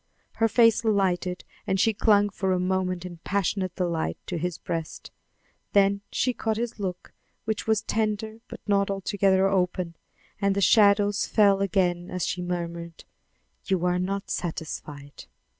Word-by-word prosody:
Her 225 - +4
face 230 0 +4
lighted 185 -4 0 0.2
and 190 - +1
she 225 +3 +3
clung 205 0 +3
for 190 -1 -1
a 180 - +1
moment 185 -1 -1
in 175 -1 -8
passionate 190 0 -1
delight 170 -3 -1
to 175 - -3
his 175 +1 -2
breast; 165 -2 -5 0.6
then 200 0 +4
she 250 - +1
caught 220 -2 -2
his 235 -1 -3
look, 185 -3 -5 0.3
which 220 -1 -2
was 220 -1 +2
tender 220 0 -2
but - - -10
not 200 -1 +2
altogether 195 -1 +2
open, 180 -3 0 0.5
and 200 -1 +2
the - - +1
shadows 205 0 +4
fell 200 -2 +4
again 180 -3 0
as 180 -1 -2
she 180 - -2
murmured: 170 -1 -5 0.6
"You 185 -3 0
are 180 0 +1
not 195 +2 -3
satisfied. 150 -4 -6
195 Hz, 150 wpm, -26 LUFS, 180-205 Hz, 0.6 s, Her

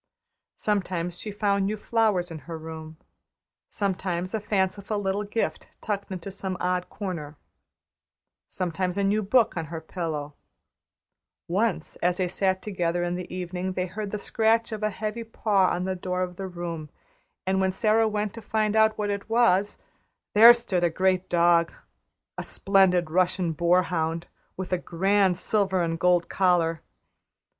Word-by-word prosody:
Sometimes 180 -4 -1
she 215 - -5
found 200 -1 +1
new 215 +1 -2
flowers 210 -5 +1
in 160 - -6
her 165 - -4
room; 160 0 -9 0.7
sometimes 185 -2 -2
a 220 - 0
fanciful 200 0 -1
little 200 0 -1
gift 210 +2 -2
tucked 200 -2 -4
into 185 +1 -5
some 190 -1 -4
odd 180 0 -1
corner, 165 -7 -6 1.1
sometimes 180 +1 -2
a 200 - +1
new 205 +2 +2
book 220 +3 +3
on 165 -2 -2
her 160 +1 -6
pillow; 160 -3 -4 1.1
once 195 -1 -1
as 180 0 +1
they 185 - 0
sat 190 +1 0
together 175 -4 -1
in 175 0 -1
the 180 0 -5
evening 180 +1 -3
they 180 0 -1
heard 205 +3 -5
the 210 - -3
scratch 225 +2 +1
of 220 -1 -4
a 215 - +1
heavy 215 +2 -4
paw 210 -4 +2
on 180 - -1
the 190 0 -1
door 180 0 -2
of 180 -1 -5
the 195 +1 -5
room, 170 -4 -6 0.6
and 190 0 +1
when 190 0 +2
Sara 220 +3 +3
went 210 -1 -2
to 230 - -8
find 215 0 0
out 220 0 +4
what 205 -1 -1
it 200 +2 -4
was, 210 -4 +3 0.6
there 225 +3 +10
stood 235 -7 0
a 175 - +4
great 185 +2 +1
dog 170 -1 +4 0.7
a - - -3
splendid 180 -4 +2
Russian 180 0 +1
boar 170 +3 +3
hound 165 -1 -2 0.3
with 185 0 -4
a 180 - +1
grand 190 +1 +2
silver 190 -2 +1
and 165 0 -2
gold 180 -1 +3
collar. 170 -4 +2
185 Hz, 160 wpm, -26 LUFS, 175-205 Hz, 1.1 s, there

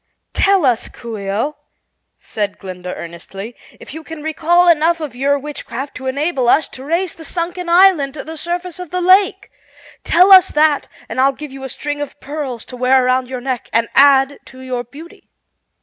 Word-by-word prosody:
"Tell 390 -5 +3
us, 245 -3 +1
Coo 235 -2 -8
ee 195 -1 -5
oh," 230 +10 -2 0.6
said 205 -2 -4
Glinda 180 -1 -7
earnestly, 195 +6 -9 0.2
"if - - -11
you 320 +1 -8
can 320 -1 -9
recall 335 +3 +2
enough 335 0 +3
of 300 -5 -6
your 280 +3 +1
witchcraft 275 -2 -6
to 260 - -7
enable 275 -2 0
us 310 - +3
to 260 - -10
raise 335 +5 -1
the 325 - -12
sunken 345 +1 -4
island 340 -6 +4
to 290 - -6
the 320 +1 -8
surface 350 +3 -4
of 360 -3 -7
the 365 - -2
lake. 385 +3 +3 0.5
Tell 365 +3 +4
us 375 -2 +9
that 300 -1 +2 0.2
and 255 - -1
I'll 275 +1 +3
give 300 +1 -9
you 270 0 -10
a 265 - -5
string 290 +3 -4
of 290 0 -7
pearls 275 -5 -6
to 255 - -10
wear 255 +1 +3
around 255 0 +1
your 255 -1 -5
neck 255 -2 -4
and 230 0 +1
add 275 0 +5
to 260 -1 -13
your 255 -2 -4
beauty." 300 +8 -14
285 Hz, 195 wpm, -17 LUFS, 255-335 Hz, 0.6 s, us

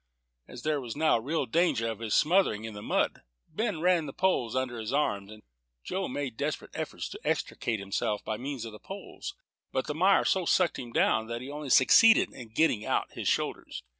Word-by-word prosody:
As 125 - -10
there 150 -2 0
was 120 -3 -6
now 155 -4 +3
real 145 +5 -1
danger 140 -4 +1
of 110 -2 -4
his 110 -2 -1
smothering 160 - +3
in 110 - -6
the 105 - -8
mud, - - 0 0.3
Ben 190 0 -2
ran 175 -3 +3
the 135 - -7
poles 180 -12 +1
under 130 -2 -2
his 110 -1 -4
arms. 105 -8 0 0.5
Joe 190 0 -2
made 135 -2 -4
desperate 145 -1 -3
efforts - - -4
to - - -8
extricate 115 -2 -1
himself 100 +1 -2
by 110 - -2
means 130 -1 -5
of 115 - -7
the 105 - -11
poles, 195 +1 -8 0.4
but 130 - -1
the 150 - -3
mire 190 +5 +4
so 190 - +2
sucked 175 +1 +2
him 120 -2 -7
down, 110 -1 +2
that 115 +1 -4
he 135 +2 -7
only 145 -1 -6
succeeded 225 - +6
in 120 -3 -10
getting 120 -4 +2
out - - -1
his - - -4
shoulders. - - -2
130 Hz, 200 wpm, -29 LUFS, 115-160 Hz, 0.5 s, succeeded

